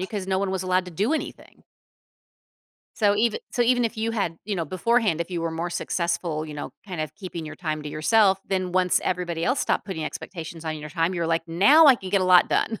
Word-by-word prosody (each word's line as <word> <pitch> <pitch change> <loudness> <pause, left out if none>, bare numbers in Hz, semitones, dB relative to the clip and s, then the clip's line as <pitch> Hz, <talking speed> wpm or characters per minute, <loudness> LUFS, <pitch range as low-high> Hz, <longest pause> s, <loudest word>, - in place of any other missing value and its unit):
you 185 - -2
'cause 200 -2 -5
no 190 0 0
one 195 0 -1
was 190 -1 -2
allowed 185 0 +1
to - - -7
do 205 - 0
anything. 320 - -5 1.3
So 205 -2 +3
eve 220 +1 +2 0.2
so 245 - +2
even 245 0 +3
if 230 0 -2
you 220 +1 -1
had, 200 -7 -2
you 205 0 -2
know, 165 - -1
beforehand, 205 +1 +1
if 170 - -3
you 175 -2 -2
were 165 0 -2
more 165 +2 -3
successful, 170 -3 -2
you 155 -1 -8
know, 145 - -6
kind 180 -5 -5
of 155 - -4
keeping 180 -5 -7
your 155 - -7
time 155 -2 -4
to 150 - -6
yourself, 190 +6 +3
then 185 -2 -1
once 185 -1 +2
everybody 175 -2 -2
else 250 +3 +1
stopped - - 0
putting 180 -6 -4
expectations 165 -1 -7
on 160 -1 -3
your 150 0 -8
time, 165 +4 0
you're 170 -2 -1
like, 165 0 0
"Now 235 - +6
I 275 - +8
can 190 -5 -8
get 200 0 +3
a - - +1
lot 180 -1 +6
done." 225 - 0
185 Hz, 245 wpm, -24 LUFS, 165-205 Hz, 1.3 s, I